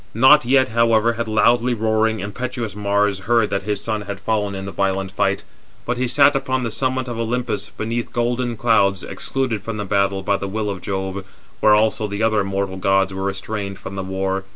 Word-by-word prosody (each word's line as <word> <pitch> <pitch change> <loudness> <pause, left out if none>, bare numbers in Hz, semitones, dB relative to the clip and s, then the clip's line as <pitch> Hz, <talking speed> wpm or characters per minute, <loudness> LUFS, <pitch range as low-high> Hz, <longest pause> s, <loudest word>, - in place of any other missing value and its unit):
Not 130 +4 +6
yet, 130 0 +3
however, 115 0 +3
had 115 0 -3
loudly 120 +3 +3
roaring, 110 0 +1
433 105 - -6
impetuous 120 0 -4
Mars 100 -1 +1
heard 105 +1 +1
that 100 0 0
his 105 -1 -1
son 110 -1 -2
had 100 -1 -6
fallen 105 -1 -1
in 95 0 -5
the 100 - -5
violent 95 -1 -1
fight; 100 0 0 0.4
but 125 0 -1
he 125 0 0
sat 140 +3 +5
upon 130 -1 -1
the 115 - -2
summit 130 +3 -1
of 120 -2 -5
Olympus, 115 -3 -2
beneath 115 +2 -4
golden 120 0 -1
clouds, 100 -5 +2
excluded 130 -6 -3
[from 110 +1 -5
the 105 - -3
battle] 100 0 0
by 100 0 +1
the 100 - -4
will 105 +1 -2
of 95 -3 -6
Jove, 95 0 -3 0.4
where 105 -1 +5
also 110 0 +1
the 100 +2 -3
other 110 -1 +3
immortal 95 -1 -2
gods 95 0 +2
were 95 - -5
restrained 100 0 -4
from - - -8
the 95 - -3
war. 95 0 -2
105 Hz, 205 wpm, -21 LUFS, 100-120 Hz, 0.4 s, Not